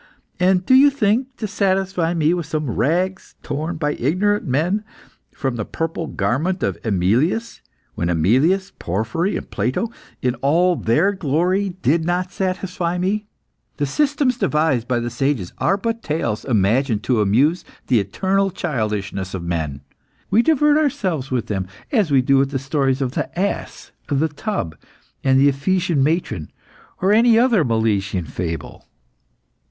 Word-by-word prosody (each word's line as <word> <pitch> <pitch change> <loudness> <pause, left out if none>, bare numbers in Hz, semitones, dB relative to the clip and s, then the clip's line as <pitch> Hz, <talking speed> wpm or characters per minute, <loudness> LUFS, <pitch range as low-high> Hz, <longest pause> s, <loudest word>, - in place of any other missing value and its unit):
And 180 0 +3
do - - +3
you 275 +2 +8
think 250 -2 +1
to 220 - -3
satisfy 190 -4 0
me 160 0 +2
with 170 -3 -3
some 155 -5 -2
rags, 180 - -1
torn 155 +4 -3
by 150 -2 0
ignorant 200 - 0
men 170 +11 0 0.5
from 130 -3 -3
the 110 - -2
purple 165 +6 -3
garment 170 +11 -1
of - - -2
AEmilius, 115 - 0 0.3
when 85 - -2
AEmilius, 130 - +2
Porphyry, 110 - -1
and - - -9
Plato, 130 - -1 0.3
in 125 -1 0
all 175 +6 +3
their 155 - +2
glory, 185 +2 0
did 160 +3 +2
not 180 +2 -1
satisfy 185 -2 -2
me! 200 +4 -1 0.5
The 145 - 0
systems 275 - +1
devised 150 - +1
by 125 -2 +1
the 120 0 -3
sages 135 -10 -1
are 195 - +2
but 230 +2 -2
tales 150 - -2
imagined 115 0 +1
to 120 -4 +1
amuse 135 - +2 0.2
the 125 -3 +3
eternal 190 - 0
childishness 105 - -3
of 90 - -5
men. 80 -5 -3 0.5
We 215 +4 +5
divert 300 +1 +3
ourselves 200 - -1
with 125 -3 -1
them, 95 -3 -3 0.2
as 215 - +2
we 135 -3 +4
do 135 +2 +3
with 135 0 +2
the 140 - -2
stories 135 0 0
of 125 - -2
The - - -3
Ass, 200 +2 -3 0.2
The 150 +2 +1
Tub, 150 - -4 0.5
and 135 -1 +4
The 140 +1 +6
Ephesian 170 +2 0
Matron, 135 - -1 0.5
or 190 - +4
any 230 +1 +5
other 235 -7 +4
Milesian 105 - 0
fable." 80 -2 -5
155 Hz, 150 wpm, -20 LUFS, 120-190 Hz, 0.5 s, you